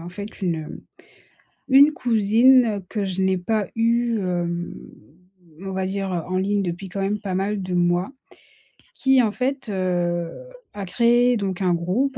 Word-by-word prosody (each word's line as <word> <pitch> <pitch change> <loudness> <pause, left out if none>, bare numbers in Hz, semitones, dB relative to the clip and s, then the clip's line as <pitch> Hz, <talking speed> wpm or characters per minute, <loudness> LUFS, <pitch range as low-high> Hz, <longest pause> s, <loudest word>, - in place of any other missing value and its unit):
en 170 - -8
fait, 205 +2 -9
une, 175 -3 +1
hem, 155 -1 -8 0.9
une 280 +3 +7
cousine 230 -2 +3
que 205 -2 -2
je 190 0 -2
n'ai 190 -1 +1
pas 210 +3 -1
eue, 230 0 +1
hem, 175 -2 -3 0.9
on 195 0 -6
va 190 0 -2
dire, 195 0 -3
heu, 170 -2 -2
en 185 - -2
ligne, 200 +1 0
depuis 180 +2 -5
quand 195 +2 -5
même 200 +2 -1
pas 195 -3 -4
mal 195 +1 -1
de 185 0 -4
mois 175 +2 +1 0.9
qui, 265 -1 +3
en 220 -3 +1
fait, 265 +3 -3
heu, 175 -3 -1 0.4
a 200 -1 -5
créé 240 +5 +3
donc 195 -2 -3
un 180 -2 +2
groupe 210 +11 -1
195 Hz, 170 wpm, -22 LUFS, 180-230 Hz, 0.9 s, une